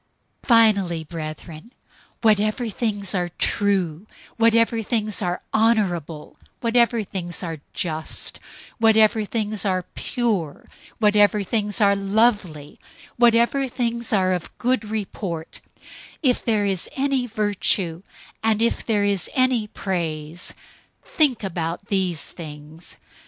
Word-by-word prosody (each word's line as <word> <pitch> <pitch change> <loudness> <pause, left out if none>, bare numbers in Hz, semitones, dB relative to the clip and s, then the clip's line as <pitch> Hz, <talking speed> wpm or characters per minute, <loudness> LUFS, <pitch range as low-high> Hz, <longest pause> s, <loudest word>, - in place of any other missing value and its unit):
004:008 - - -21
Finally, 200 - +4
brothers, 155 0 -7 0.6
whatever 215 +2 +2
things 205 -3 -2
are 180 -2 -1
true, 195 -3 0 0.3
whatever 230 0 +3
things 215 -2 -2
are 180 -2 -2
honorable, 185 -9 0 0.2
whatever 235 -1 +2
things 180 -3 -5
are 165 -3 -4
just, 160 -4 -3 0.4
whatever 220 0 +4
things 215 -2 -2
are 185 -2 0
pure, 205 - -2 0.3
whatever 210 -1 +4
things 205 0 -1
are 200 -2 +4
lovely, 195 -7 0 0.4
whatever 240 +3 +4
things 235 -2 -2
are 185 -3 +2
of 180 -2 -5
good 250 -1 0
report; 195 -6 -5 0.6
if 255 -3 +2
there 215 -3 +1
is 190 -3 -1
any 270 -2 0
virtue, 205 -5 -1 0.4
and 220 -1 +2
if 235 - 0
there 210 -3 +1
is 200 -4 +1
any 255 -4 +2
praise, 170 -4 -4 0.5
think 270 -8 +2
about 170 0 -4
these 185 -6 0
things. 155 0 -10
205 Hz, 115 wpm, -23 LUFS, 175-225 Hz, 0.6 s, Finally